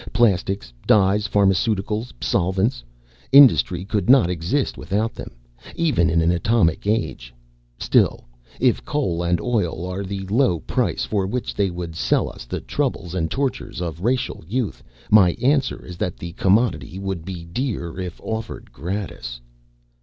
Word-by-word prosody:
Plastics, 100 - +1
dyes, 105 +1 +4
pharmaceuticals, 105 +3 +1
solvents. 95 - 0 0.5
Industry 125 -10 +6
could 100 -1 -1
not 125 -9 +6
exist 90 - -1
without 110 +3 -2
them, - - -8 0.5
even 145 - +2
in 85 0 +2
an 85 +1 +3
atomic 90 0 +1
age. 105 - -1 0.5
Still, - - +2 0.4
if 125 -2 +2
coal 110 - -1
and 85 0 +1
oil 95 -8 -1
are 90 +2 -4
the 95 0 -5
low 105 -3 +2
price - - -1
for 100 -3 -1
which 125 +4 -3
they 100 -1 +1
would 85 -2 -6
sell - - +1
us - - -11
the - - -4
troubles 85 0 -2
and 80 -3 -1
tortures 130 - -3
of 85 -2 -4
racial 125 -1 -1
youth, 100 - -2 0.3
my 95 -5 +6
answer 140 +2 0
is 90 -2 -9
that 90 -1 -3
the 85 - -7
commodity 100 0 +1
would 95 -4 -4
be 90 -2 -7
dear 85 -3 -3
if 90 -3 -5
offered 110 0 -5
gratis." 80 -8 -5
95 Hz, 145 wpm, -22 LUFS, 85-115 Hz, 0.5 s, Industry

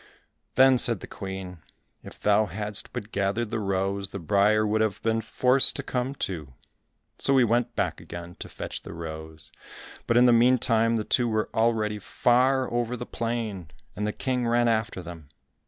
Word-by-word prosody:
Then 130 -1 +6
said 115 -6 +1
the - - -7
Queen, 95 -2 -7 0.4
"If - - -13
thou 105 +1 +3
hadst 105 0 -4
but 110 -3 -7
gathered 100 +3 -1
the 115 - -1
rose, 95 -1 -1
the - - -6
briar 100 +5 +2
would 110 +1 +1
have 110 -3 0
been 115 0 +1
forced 125 +4 +4
to - - -3
come 130 +2 -3
too." 75 - -5 0.6
So 135 - +3
he 130 - +6
went 120 +1 0
back - - -2
again 85 0 -9
to - - -8
fetch - - -6
the - - -10
rose, 80 -1 -8 0.6
but 115 - +3
in 125 - +6
the 120 - +6
meantime 115 -1 +3
the 110 - -1
two 120 +3 +1
were 110 -1 -1
already 110 -2 +1
far 130 +5 +2
over 120 0 -1
the 120 - -6
plain, 115 -9 -4 0.3
and 105 +1 -2
the - - 0
King 125 +1 -2
ran 120 0 +2
after 110 -4 -1
them. 85 -4 -10
110 Hz, 180 wpm, -26 LUFS, 95-120 Hz, 0.6 s, Then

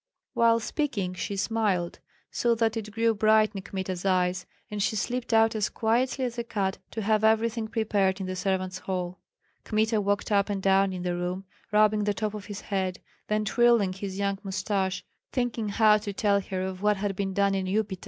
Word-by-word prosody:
While 230 -2 +4
speaking 220 - -2
she 200 +2 -4
smiled, 195 -4 0 0.3
so 235 -1 +2
that 225 0 +1
it 215 -2 -4
grew 225 +1 +1
bright 215 0 +4
in 195 - -5
Kmita's 190 -2 -4
eyes, 180 -1 +1 0.2
and 210 -1 -3
she 215 - +1
slipped 245 +4 -2
out 225 0 +4
as 215 -2 0
quietly 250 +4 0
as 240 -1 -4
a - - -1
cat 195 -5 -2
to 220 - -4
have 215 +1 +2
everything 220 +1 +2
prepared 205 -4 +1
in 190 - -3
the 185 0 -4
servants' 185 0 -1
hall. 185 -1 -4 0.4
Kmita 220 0 +1
walked 205 +1 -1
up 200 0 +3
and 200 -1 -1
down 195 0 +3
in 180 -1 -5
the 175 -1 -1
room, 180 +2 -3 0.3
rubbing 210 0 +4
the 205 -1 0
top 215 -1 -2
of 210 -2 -7
his 205 -2 -6
head, 190 -2 -2 0.3
then 215 0 0
twirling 235 -4 +3
his 190 0 -6
young 200 -1 -1
mustache, 190 -1 -2 0.3
thinking 240 -4 -1
how 215 0 +5
to 205 -1 -5
tell 200 0 +2
her 185 -1 -4
of 190 0 -5
what 210 0 +2
had 195 0 -2
been 195 -1 -2
done 200 -1 +3
in 190 -1 -1
Upita. 200 -1 -1
205 Hz, 200 wpm, -27 LUFS, 190-220 Hz, 0.4 s, how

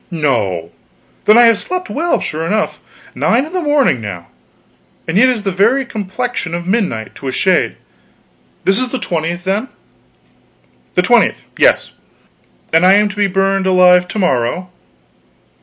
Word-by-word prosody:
"No! 110 - -1 0.5
Then 215 - +6
I 240 - +7
have 230 -3 +4
slept 365 0 -4
well, 335 +4 -1
sure 155 +1 -4
enough. 210 +6 -1 0.3
Nine 245 +5 +1
in 320 - -11
the 365 - -1
morning 290 - +2
now! 90 -5 -7 0.8
And 165 - -2
yet 255 +6 +5
it 255 - +1
is 215 - -7
the 195 - -1
very 230 +9 +2
complexion 215 -4 -4
of 170 0 -5
midnight, 180 - -2
to 135 - -9
a - - -1
shade. 185 +6 +1 0.9
This 195 +1 +2
is 255 0 -2
the 260 - -3
20th, 170 -4 -3
then?" 200 +7 -1 1.3
"The - - +3
20th - - +2
yes." - - +2 0.8
"And 165 +2 +4
I 190 +2 +6
am 210 0 +3
to 195 - -8
be 205 -1 +1
burned 195 0 0
alive 180 -1 +5
to 175 - -7
morrow." 180 - -1
190 Hz, 160 wpm, -15 LUFS, 165-230 Hz, 1.3 s, I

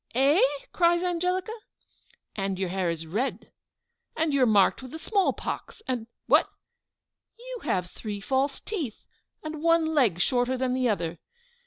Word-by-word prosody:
"Eh!" 275 +7 +4 0.3
cries 345 0 +3
Angelica. 360 +3 0 0.8
"And 195 -2 -2
your 190 -1 -1
hair 185 -1 0
is 165 -1 -3
red 215 +12 -3 0.7
and 315 -2 +1
you 280 - +3
are - - +7
marked 205 0 +4
with 260 - -9
the 320 - -7
small 395 +4 +1
pox 440 - -6
and 240 -3 -2 0.2
what? - - +4 0.9
you - - -8
have 180 -1 -1
three 210 -2 -6
false 270 +6 0
teeth 315 - -5 0.4
and 310 -1 -5
one 330 0 +4
leg 235 - +3
shorter 250 +4 +1
than 255 0 0
the 255 -1 +1
other!" 170 -5 -2
260 Hz, 155 wpm, -27 LUFS, 205-330 Hz, 0.9 s, are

